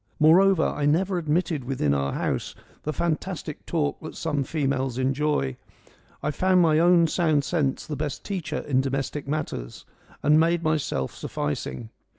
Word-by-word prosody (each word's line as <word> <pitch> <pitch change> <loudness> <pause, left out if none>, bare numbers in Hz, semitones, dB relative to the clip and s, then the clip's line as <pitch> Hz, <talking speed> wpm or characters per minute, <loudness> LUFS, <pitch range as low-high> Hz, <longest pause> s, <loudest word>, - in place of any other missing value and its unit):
Moreover, 175 +3 +5
I 145 -1 0
never 180 +5 +2
admitted 160 -2 0
within 120 - 0
our 70 -1 0
house - - -2 0.3
the 155 - -2
fantastic 165 -1 -3
talk 150 -4 -1
that 155 - -8
some 145 -4 -1
females 135 -3 -1
enjoy: 135 - 0 0.7
I 150 - 0
found 185 +4 +3
my 160 -3 +4
own 170 0 +5
sound 155 -3 +2
sense 145 -4 -1
the 150 - -4
best 145 -1 -4
teacher 170 -6 -3
in 130 -2 +1
domestic 135 +1 -3
matters, 140 - -4 0.4
and 150 +2 +5
made 170 +1 +2
myself 155 - -1
sufficing. 75 +10 -4
150 Hz, 150 wpm, -25 LUFS, 135-165 Hz, 0.7 s, Moreover